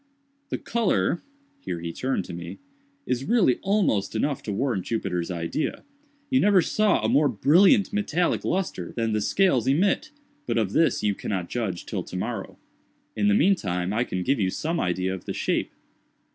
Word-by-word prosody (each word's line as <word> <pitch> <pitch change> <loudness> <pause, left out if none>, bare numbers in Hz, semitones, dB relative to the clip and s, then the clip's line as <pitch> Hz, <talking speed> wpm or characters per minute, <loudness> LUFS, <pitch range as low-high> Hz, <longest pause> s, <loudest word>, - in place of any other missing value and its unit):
The - - -2
color"—here 235 - -2
he 85 0 -5
turned 130 +7 -2
to - - -8
me—"is 275 - -7
really 205 - +3
almost 185 - +1
enough 140 +5 0
to 105 - -5
warrant 105 -2 -1
Jupiter's 90 -7 -2
idea. 85 - -3 0.5
You 260 - +4
never 205 -4 +5
saw 210 - +2
a - - +3
more 140 +6 +4
brilliant 180 - +4
metallic 180 -4 0
lustre 175 - -2
than 115 -2 -1
the 105 - 0
scales 180 - +2
emit—but 290 - -1
of 105 -4 +1
this 160 -6 +2
you 105 -1 +2
cannot 95 -3 -4
judge 105 -8 -3
till - - -3
tomorrow. - - -5 0.6
In 105 -1 +1
the 100 - +4
mean 185 - +5
time 90 - -2
I 115 +3 +1
can 90 -6 -3
give 135 +6 +1
you 95 -3 +1
some 165 - -2
idea 90 +1 -1
of 95 - -7
the - - -3
shape." - - -1
130 Hz, 165 wpm, -25 LUFS, -, 0.6 s, never